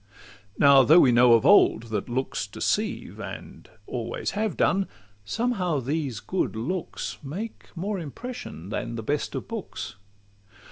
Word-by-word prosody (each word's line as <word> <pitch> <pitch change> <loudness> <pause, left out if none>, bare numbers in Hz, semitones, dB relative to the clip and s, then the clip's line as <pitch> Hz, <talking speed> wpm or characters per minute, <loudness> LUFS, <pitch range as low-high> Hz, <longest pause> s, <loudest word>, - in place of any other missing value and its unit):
Now 140 -1 +7
though 155 +6 +7
we 130 - +6
know 120 0 +6
of 115 - +4
old 110 - +6
that 105 - -2
looks 130 +2 -2
deceive, - - -2
And - - -9 0.2
always 120 0 -3
have 215 -1 -2
done, 195 0 +2 0.4
somehow 190 - 0
these 135 -3 -2
good 185 - -2
looks 160 +11 -4
Make 185 +11 -6
more 195 +3 -2
impression 155 - -7
than 115 +2 -3
the 115 - -5
best 145 +5 -2
of - - -4
books. 225 - -6
145 Hz, 140 wpm, -26 LUFS, 120-190 Hz, 0.4 s, Now